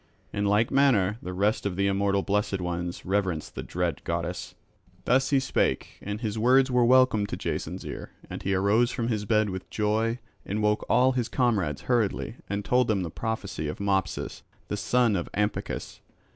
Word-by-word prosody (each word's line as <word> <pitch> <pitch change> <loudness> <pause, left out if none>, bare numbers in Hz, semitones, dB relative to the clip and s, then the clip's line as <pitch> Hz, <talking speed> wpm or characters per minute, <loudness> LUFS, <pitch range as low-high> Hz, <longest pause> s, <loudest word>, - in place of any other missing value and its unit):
In 105 0 -1
like 105 +3 +2
manner 115 -7 +3
the 90 - -5
rest 100 +4 +1
of 100 -3 -2
the 100 +1 +1
immortal 100 0 +1
blessed 100 -1 0
ones 90 -1 -4
reverence 95 -5 -1
the - - -6
dread 85 -3 -2
goddess." 85 +1 -3 0.5
Thus 130 +2 +3
he 140 - +4
spake, 130 - -1
and 105 +2 -5
his 110 -2 -2
words 130 +3 +4
were 125 -1 +4
welcome 125 -4 +4
to - - -4
Jason's - - -4
ear. - - -6 0.2
And - - -7
he 95 0 0
arose 105 +5 +3
from 120 -2 -2
his 105 -3 -1
bed 105 -1 +2
with 95 0 -6
joy 110 +2 0 0.3
and 105 +2 -2
woke 105 0 +2
all 130 +1 +5
his 125 -3 -1
comrades 105 - +1
hurriedly 120 -1 0
and 100 0 -2
told 125 -1 +3
them 100 -4 +1
the 85 - -5
prophecy 100 -8 -3
of 75 - -5
Mopsus 95 -1 -1 0.3
the - - -1
son 120 +1 +2
of 85 - -2
Ampycus. 105 +1 -2
105 Hz, 185 wpm, -27 LUFS, 95-115 Hz, 0.5 s, all